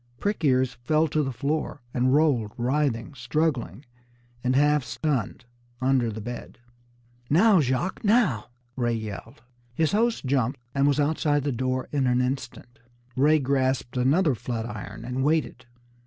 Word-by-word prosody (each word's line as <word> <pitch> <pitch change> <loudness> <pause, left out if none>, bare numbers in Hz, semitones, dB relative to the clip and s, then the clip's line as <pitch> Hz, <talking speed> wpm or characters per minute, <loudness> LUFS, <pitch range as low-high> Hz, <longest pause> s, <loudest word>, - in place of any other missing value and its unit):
Prick 205 -3 -2
ears 130 -3 +2
fell 155 +5 +2
to 155 - +1
the 135 -2 -2
floor, 145 +1 -3
and 130 +1 +2
rolled, 135 -8 +2
writhing, 125 0 0
struggling 130 - -2 0.6
and 130 0 +1
half 145 0 +3
stunned, 130 -6 -2 0.3
under 130 -2 +2
the 110 - -6
bed. 120 +2 -7 0.7
"Now, 190 +5 +5
Jacques, 135 - -1
now!" 205 - +2 0.3
Ray 120 -2 0
yelled. 110 +1 -7 0.3
His 160 +2 +1
host 225 -3 +1
jumped, 130 0 0
and 140 0 +2
was 145 0 +2
outside 145 -1 +1
the 145 - 0
door 130 +1 -2
in 140 -3 +1
an 125 0 +2
instant. 125 -1 -4 0.4
Ray 150 +4 +4
grasped 130 -3 0
another 140 +6 +3
flat 115 -1 -4
iron 105 0 -7
and 125 +2 -2
waited. 145 -5 0
130 Hz, 145 wpm, -25 LUFS, 120-150 Hz, 0.7 s, Now